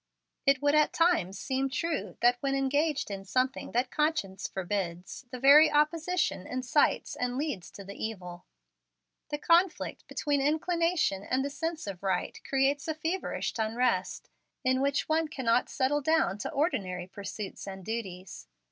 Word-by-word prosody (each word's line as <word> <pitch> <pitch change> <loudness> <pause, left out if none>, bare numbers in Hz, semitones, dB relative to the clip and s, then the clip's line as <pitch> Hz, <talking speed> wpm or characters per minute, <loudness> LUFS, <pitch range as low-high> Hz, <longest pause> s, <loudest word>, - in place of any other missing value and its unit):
It 275 0 +4
would 290 0 +4
at 305 0 +4
times 330 - +2
seem 265 +4 -1
true 265 - -3
that, 245 +1 +5
when 275 +1 0
engaged 280 -1 0
in 195 -1 -5
something 255 +6 -1
that 245 +2 +1
conscience 200 - -1
forbids, 185 +3 -4
the 255 0 -7
very 290 +4 +8
opposition 310 - +1
incites 255 +3 +1
and 250 0 -2
leads 275 - -3
to 200 - -10
the 200 +1 -8
evil. 180 -5 -6 0.8
The 295 - -2
conflict 340 +4 +1
between 285 -2 0
inclination 320 - +1
and 260 +6 -1
the 285 - -3
sense 325 +2 -3
of 195 -3 -6
right 195 - -2
creates 275 +2 +1
a 315 - -1
feverish 325 +5 -2
unrest, 220 -3 0 0.3
in 260 0 +2
which 280 +1 +1
one 315 0 +1
cannot 250 -5 +1
settle 290 +2 +1
down 300 - +2
to - - -3
ordinary 240 - -1
pursuits 200 +2 -7
and 190 -1 -7
duties. 190 - -6
265 Hz, 150 wpm, -29 LUFS, 200-300 Hz, 0.8 s, very